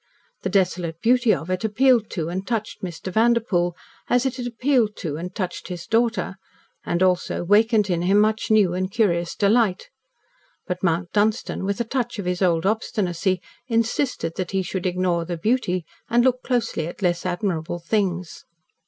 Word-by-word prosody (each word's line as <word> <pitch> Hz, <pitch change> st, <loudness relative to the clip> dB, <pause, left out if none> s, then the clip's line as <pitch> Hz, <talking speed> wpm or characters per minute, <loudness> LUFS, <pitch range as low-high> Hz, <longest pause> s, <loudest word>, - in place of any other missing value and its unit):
The 190 Hz, -, -2 dB
desolate 180 Hz, -4 st, 0 dB
beauty 245 Hz, +1 st, +3 dB
of 160 Hz, +2 st, -1 dB
it 185 Hz, +2 st, -1 dB
appealed 230 Hz, +1 st, +3 dB
to 165 Hz, -4 st, -3 dB
and 185 Hz, +3 st, -4 dB
touched 225 Hz, -3 st, -3 dB
Mr. 180 Hz, 0 st, -6 dB
Vanderpoel, 220 Hz, -6 st, +2 dB, 0.3 s
as 245 Hz, +1 st, +3 dB
it 265 Hz, 0 st, -1 dB
had 245 Hz, -1 st, -3 dB
appealed 240 Hz, -3 st, +1 dB
to 155 Hz, -5 st, -4 dB
and 180 Hz, +4 st, -6 dB
touched 185 Hz, -5 st, -4 dB
his 175 Hz, -2 st, -6 dB
daughter, 225 Hz, -4 st, 0 dB, 0.5 s
and, 175 Hz, +2 st, 0 dB
also, 180 Hz, -1 st, +1 dB
wakened 210 Hz, +3 st, +4 dB
in 175 Hz, -3 st, 0 dB
him 190 Hz, +3 st, +3 dB
much 215 Hz, +1 st, +1 dB
new 210 Hz, -5 st, +4 dB
and 185 Hz, +1 st, -1 dB
curious 175 Hz, -5 st, +1 dB
delight. 205 Hz, -2 st, +2 dB, 0.7 s
But 180 Hz, -2 st, -4 dB
Mount 175 Hz, 0 st, 0 dB
Dunstan, 210 Hz, -2 st, 0 dB
with 200 Hz, 0 st, -1 dB
a -, -, +2 dB
touch 240 Hz, 0 st, -2 dB
of 200 Hz, -, -4 dB
his 180 Hz, 0 st, -2 dB
old 170 Hz, -2 st, +2 dB
obstinacy, 190 Hz, -4 st, 0 dB, 0.3 s
insisted 230 Hz, -, 0 dB
that 185 Hz, -2 st, -2 dB
he 190 Hz, -1 st, 0 dB
should 185 Hz, +1 st, -3 dB
ignore 180 Hz, -1 st, 0 dB
the 170 Hz, 0 st, -4 dB
beauty, 185 Hz, -3 st, 0 dB, 0.2 s
and 240 Hz, +1 st, +4 dB
look 255 Hz, 0 st, +2 dB
closely 235 Hz, -10 st, -1 dB
at 175 Hz, -, -8 dB
less 175 Hz, -1 st, +1 dB
admirable 175 Hz, -2 st, -2 dB
things. 180 Hz, -2 st, -2 dB
190 Hz, 170 wpm, -23 LUFS, 175-225 Hz, 0.7 s, wakened